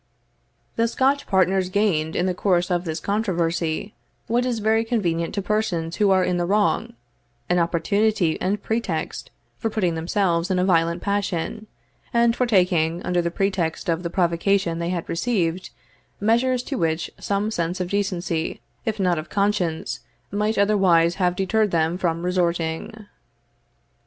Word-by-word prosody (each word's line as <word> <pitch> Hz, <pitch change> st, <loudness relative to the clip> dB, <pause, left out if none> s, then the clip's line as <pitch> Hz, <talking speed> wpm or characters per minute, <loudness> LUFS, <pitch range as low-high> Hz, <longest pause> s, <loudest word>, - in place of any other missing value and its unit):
The 230 Hz, 0 st, +3 dB
Scotch 270 Hz, +4 st, +1 dB
partners 190 Hz, -1 st, +2 dB
gained, 185 Hz, -6 st, +1 dB
in 175 Hz, -, +1 dB
the 185 Hz, -, +1 dB
course 180 Hz, -1 st, +1 dB
of 175 Hz, 0 st, 0 dB
this 160 Hz, 0 st, -3 dB
controversy, 175 Hz, -2 st, -1 dB, 0.3 s
what 245 Hz, +2 st, +1 dB
is 240 Hz, -2 st, -1 dB
very 220 Hz, +1 st, +2 dB
convenient 175 Hz, -8 st, -1 dB
to 200 Hz, -, -2 dB
persons 180 Hz, -6 st, -1 dB
who 205 Hz, -1 st, +3 dB
are 190 Hz, -1 st, +4 dB
in 180 Hz, -1 st, 0 dB
the 175 Hz, 0 st, -1 dB
wrong, 205 Hz, +2 st, +1 dB, 0.6 s
an 180 Hz, 0 st, +3 dB
opportunity 175 Hz, +1 st, +1 dB
and 200 Hz, +2 st, -1 dB
pretext 220 Hz, -8 st, -3 dB, 0.3 s
for 225 Hz, -, -1 dB
putting 190 Hz, -6 st, 0 dB
themselves 170 Hz, +1 st, 0 dB
in 185 Hz, -, +1 dB
a 180 Hz, -, +2 dB
violent 170 Hz, -1 st, +2 dB
passion, 200 Hz, +1 st, -2 dB, 0.5 s
and 235 Hz, 0 st, +4 dB
for 250 Hz, -, +1 dB
taking, 180 Hz, -5 st, +2 dB
under 180 Hz, -1 st, +1 dB
the 170 Hz, -, -1 dB
pretext 180 Hz, -1 st, -1 dB
of 165 Hz, 0 st, +1 dB
the 170 Hz, -, -3 dB
provocation 170 Hz, 0 st, +1 dB
they 170 Hz, 0 st, -2 dB
had 175 Hz, -2 st, -3 dB
received, 180 Hz, -3 st, -1 dB, 0.5 s
measures 240 Hz, +4 st, +2 dB
to 270 Hz, -1 st, -4 dB
which 160 Hz, 0 st, -1 dB
some 205 Hz, +2 st, -1 dB
sense 175 Hz, -2 st, -2 dB
of 180 Hz, -1 st, -3 dB
decency, 180 Hz, -5 st, -1 dB, 0.3 s
if 220 Hz, -1 st, -2 dB
not 180 Hz, -4 st, +2 dB
of 155 Hz, -, -8 dB
conscience, 180 Hz, -, -1 dB, 0.3 s
might 210 Hz, +2 st, 0 dB
otherwise 190 Hz, -5 st, +4 dB
have 180 Hz, -1 st, +2 dB
deterred 210 Hz, +3 st, +1 dB
them 165 Hz, -1 st, +1 dB
from 170 Hz, -2 st, -1 dB
resorting. 180 Hz, +4 st, -1 dB
185 Hz, 155 wpm, -23 LUFS, 170-210 Hz, 0.6 s, are